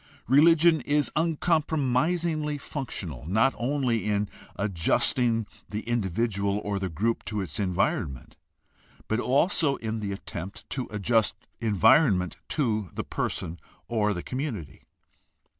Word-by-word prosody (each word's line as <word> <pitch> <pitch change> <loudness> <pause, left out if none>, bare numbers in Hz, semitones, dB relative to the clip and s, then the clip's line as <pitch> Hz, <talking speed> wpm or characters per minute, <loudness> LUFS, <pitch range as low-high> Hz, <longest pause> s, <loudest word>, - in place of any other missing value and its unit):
Religion 160 +3 +6
is 145 0 +1
uncompromisingly 155 -1 +1
functional, 100 - -5
not 110 +9 +3
only 125 -2 0
in 105 -1 +1 0.3
adjusting 110 +5 +1 0.2
the 105 +1 -3
individual 100 -2 0
or 100 -1 -2
the 95 -1 -2
group 110 +8 -1
to 105 - -3
its 85 -7 -4
environ 95 -3 +1
ment, 60 - -14 0.7
but 110 - 0
also 140 +3 +2
in 110 0 -4
the 100 -2 -3
attempt 95 -1 -7
to 130 -3 -2
adjust 110 +2 +1 0.2
environment 105 - +4
to 110 - 0
the - - -2
person 85 +1 -3 0.3
or 105 -3 +1
the 90 - -5
community. 125 - -5
115 Hz, 120 wpm, -27 LUFS, 100-145 Hz, 0.7 s, Religion